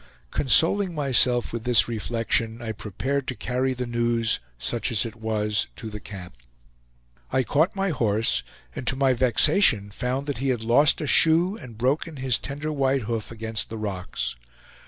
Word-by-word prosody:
Consoling 170 - +3
myself 125 -5 +2
with 115 -1 -4
this 120 -2 +4
reflection, 115 0 -1
I 115 -2 -4
prepared 130 +7 -3
to 130 - -3
carry 130 +2 -1
the 125 0 -3
news, 120 -1 0 0.2
such 110 - -2
as 110 -2 +1
it 115 0 -7
was, 105 -2 -1
to 110 - -7
the 105 - -6
camp. 95 -8 -10 0.9
I 130 0 +2
caught 155 - +1
my 195 0 0
horse, 115 - +1 0.3
and 125 - -6
to - - +2
my 135 -1 +3
vexation 125 - +3
found 130 +6 -3
he 135 +1 -1
had 120 -3 -1
lost 125 +6 +4
a - - -2
shoe 165 +6 +4
and 120 - -11
broken 140 +7 0
his 130 -3 0
tender 145 +3 -4
white 135 -3 +1
hoof 110 -1 -3
against 110 -1 -3
the 110 - -6
rocks. 90 - -3
120 Hz, 165 wpm, -25 LUFS, 110-135 Hz, 0.9 s, this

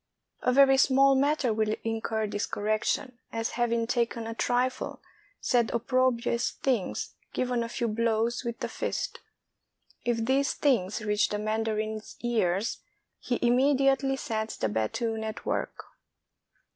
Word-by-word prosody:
A 250 - +2
very 270 +1 +6
small 270 0 +5
matter 275 -3 +2
will 215 0 +1
incur 225 -1 -1
this 205 0 -2
correction; 215 +4 -1
as 225 0 -2
having 235 -1 0
taken 235 -1 -1
a 225 - -4
trifle, 250 +2 -1 0.4
said 240 -3 +2
opprobrious 240 0 +1
things, 245 -8 -2 0.2
given 250 -1 0
a 230 - -3
few 235 0 -1
blows 230 +2 0
with 235 -1 -5
the - - -1
fist. - - -3 0.8
If 230 -2 0
these 270 +3 +2
things 215 -7 +1
reach 210 0 +2
the 210 - -1
mandarin's 215 0 -2
ears, 215 -4 0 0.4
he 245 - -1
immediately 270 +2 +3
sets 220 -5 -3
the 110 - 0
battoon 220 - -1
at 220 0 -5
work. - - -2
235 Hz, 130 wpm, -28 LUFS, 220-255 Hz, 0.8 s, very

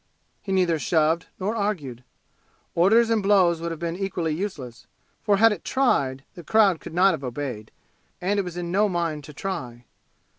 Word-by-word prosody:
He 195 - -6
neither 180 -4 +2
shoved 160 +1 +1
nor 205 +4 -2
argued. 160 - -3 0.7
Orders 225 +7 +4
and 225 -2 +2
blows 185 -5 +3
would 170 - -3
have 165 -2 -6
been 170 0 -3
equally 175 -4 -2
useless, 150 - -6 0.3
for 205 -2 +2
had 225 +2 +6
it 210 - -4
tried 135 - +1
the 175 - -11
crowd 200 -3 +3
could 165 - -10
not 190 +2 +5
have 155 - -5
obeyed, 125 -4 -5 0.5
and 200 +3 0
it - - +1
was 180 -1 -7
in 175 -1 -4
no 205 +3 +2
mind 165 -4 -2
to 150 - -11
try. 125 -12 -5
175 Hz, 180 wpm, -24 LUFS, 150-200 Hz, 0.7 s, had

